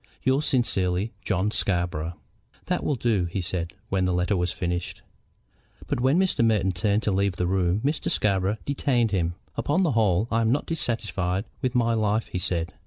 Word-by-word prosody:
"Yours 135 Hz, +3 st, +2 dB
sincerely, 100 Hz, -6 st, +1 dB
JOHN 100 Hz, +1 st, 0 dB
SCARBOROUGH." 85 Hz, -5 st, -1 dB, 0.5 s
"That -, -, -1 dB
will 145 Hz, -, +1 dB
do," 115 Hz, -7 st, +1 dB
he 85 Hz, +3 st, -3 dB
said, 85 Hz, -1 st, -3 dB, 0.2 s
when 95 Hz, -1 st, +1 dB
the 90 Hz, -, +1 dB
letter 90 Hz, +3 st, +1 dB
was 90 Hz, -1 st, 0 dB
finished. 90 Hz, -1 st, -3 dB, 0.8 s
But -, -, -2 dB
when 130 Hz, +6 st, +3 dB
Mr. 185 Hz, -10 st, +2 dB
Merton 105 Hz, -4 st, +3 dB
turned 100 Hz, +4 st, 0 dB
to 105 Hz, -, +1 dB
leave 100 Hz, 0 st, +1 dB
the 90 Hz, -, -1 dB
room 90 Hz, +1 st, +1 dB
Mr. 150 Hz, +2 st, 0 dB
Scarborough 100 Hz, 0 st, +1 dB
detained 130 Hz, -5 st, +1 dB
him. 85 Hz, -3 st, 0 dB, 0.2 s
"Upon 170 Hz, +7 st, +1 dB
the 165 Hz, -, +2 dB
whole, 110 Hz, -3 st, +2 dB
I 115 Hz, 0 st, +2 dB
am 115 Hz, 0 st, +2 dB
not 145 Hz, -, +1 dB
dissatisfied 105 Hz, -, -1 dB, 0.2 s
with 130 Hz, -1 st, -1 dB
my 115 Hz, -1 st, +3 dB
life," 110 Hz, 0 st, +1 dB
he 90 Hz, -, -3 dB
said. 85 Hz, 0 st, -1 dB
100 Hz, 180 wpm, -25 LUFS, 90-115 Hz, 0.8 s, when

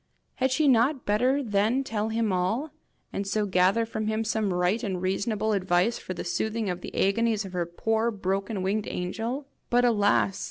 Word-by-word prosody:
Had 260 Hz, +1 st, +2 dB
she 285 Hz, +3 st, +2 dB
not 260 Hz, +2 st, +3 dB
better 250 Hz, +7 st, +2 dB
then 220 Hz, +4 st, +1 dB
tell 220 Hz, -3 st, -2 dB
him 220 Hz, -2 st, 0 dB
all, 220 Hz, +12 st, -1 dB, 0.4 s
and 200 Hz, 0 st, -3 dB
so 210 Hz, +1 st, 0 dB
gather 190 Hz, +4 st, +3 dB
from 220 Hz, -1 st, -4 dB
him 220 Hz, +1 st, 0 dB
some 215 Hz, -2 st, 0 dB
right 180 Hz, +5 st, +1 dB
and 195 Hz, -6 st, -2 dB
reasonable 205 Hz, +4 st, 0 dB
advice 185 Hz, +3 st, +1 dB
for 185 Hz, -, -6 dB
the -, -, -4 dB
soothing 215 Hz, +4 st, -1 dB
of 180 Hz, 0 st, -5 dB
the -, -, -8 dB
agonies 215 Hz, +1 st, +1 dB
of 190 Hz, -, -9 dB
her 175 Hz, -2 st, -1 dB
poor 225 Hz, +6 st, 0 dB
broken 195 Hz, -1 st, -2 dB
winged 205 Hz, +2 st, -1 dB
angel? 230 Hz, +10 st, -3 dB, 0.2 s
But 245 Hz, +1 st, +3 dB
alas! 205 Hz, -4 st, +2 dB
215 Hz, 185 wpm, -27 LUFS, 190-230 Hz, 0.4 s, not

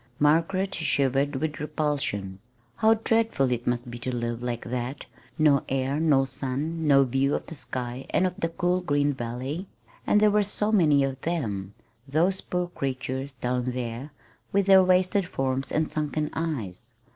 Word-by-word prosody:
Margaret 170 Hz, +6 st, +2 dB
shivered 140 Hz, -2 st, +1 dB
with 150 Hz, +2 st, -2 dB
repulsion. 140 Hz, -11 st, -2 dB, 0.4 s
How 220 Hz, +5 st, +5 dB
dreadful 225 Hz, -, +1 dB
it 120 Hz, -1 st, -2 dB
must 120 Hz, 0 st, -1 dB
be 120 Hz, -, -7 dB
to 130 Hz, -, -3 dB
live 120 Hz, 0 st, -3 dB
like 120 Hz, -1 st, -3 dB
that 125 Hz, +3 st, -4 dB, 0.3 s
no 150 Hz, -4 st, +4 dB
air, 135 Hz, +2 st, 0 dB
no 145 Hz, -4 st, +3 dB
sun, 140 Hz, +5 st, -3 dB
no 140 Hz, -1 st, +6 dB
view 135 Hz, +2 st, +1 dB
of -, -, -4 dB
the -, -, -9 dB
sky 130 Hz, -3 st, -5 dB
and 185 Hz, -, +2 dB
of 180 Hz, -, 0 dB
the 165 Hz, -, 0 dB
cool 180 Hz, +2 st, 0 dB
green 145 Hz, -4 st, +1 dB
valley! 130 Hz, +8 st, -4 dB, 0.4 s
And 210 Hz, -, +5 dB
there 210 Hz, 0 st, +5 dB
were 210 Hz, +1 st, +4 dB
so 210 Hz, +1 st, -1 dB
many 150 Hz, -9 st, +4 dB
of 135 Hz, -1 st, -3 dB
them 105 Hz, -, -3 dB, 0.3 s
those 170 Hz, +7 st, +1 dB
poor 180 Hz, -1 st, -2 dB
creatures 135 Hz, -2 st, -4 dB
down 125 Hz, 0 st, -1 dB
there, 125 Hz, +3 st, -5 dB, 0.4 s
with 200 Hz, 0 st, +2 dB
their 190 Hz, -1 st, +7 dB
wasted 185 Hz, +1 st, +2 dB
forms 135 Hz, -3 st, -1 dB
and 155 Hz, 0 st, 0 dB
sunken 150 Hz, 0 st, -2 dB
eyes! 125 Hz, -, -4 dB
140 Hz, 165 wpm, -26 LUFS, 125-165 Hz, 0.4 s, their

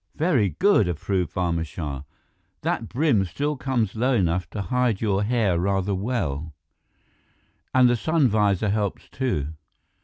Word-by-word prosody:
"Very 125 Hz, -, +1 dB
good," 200 Hz, -, +4 dB
approved 90 Hz, +2 st, -1 dB
Barma 85 Hz, -2 st, 0 dB
Shah. 75 Hz, -4 st, -5 dB, 0.6 s
"That 115 Hz, -, -2 dB
brim 125 Hz, -6 st, +2 dB
still 145 Hz, -, -2 dB
comes 125 Hz, -6 st, -1 dB
low 125 Hz, +4 st, +1 dB
enough 90 Hz, -4 st, 0 dB
to 105 Hz, -, -4 dB
hide 125 Hz, -3 st, 0 dB
your 100 Hz, -3 st, +1 dB
hair 105 Hz, -5 st, +1 dB
rather 95 Hz, +1 st, 0 dB
well, 80 Hz, -, -2 dB, 1.2 s
and 130 Hz, -1 st, +5 dB
the 120 Hz, -, +3 dB
sun 155 Hz, +4 st, +2 dB
visor 105 Hz, -2 st, +2 dB
helps 105 Hz, -1 st, -2 dB
too." 120 Hz, -, -2 dB
105 Hz, 140 wpm, -24 LUFS, 90-125 Hz, 1.2 s, and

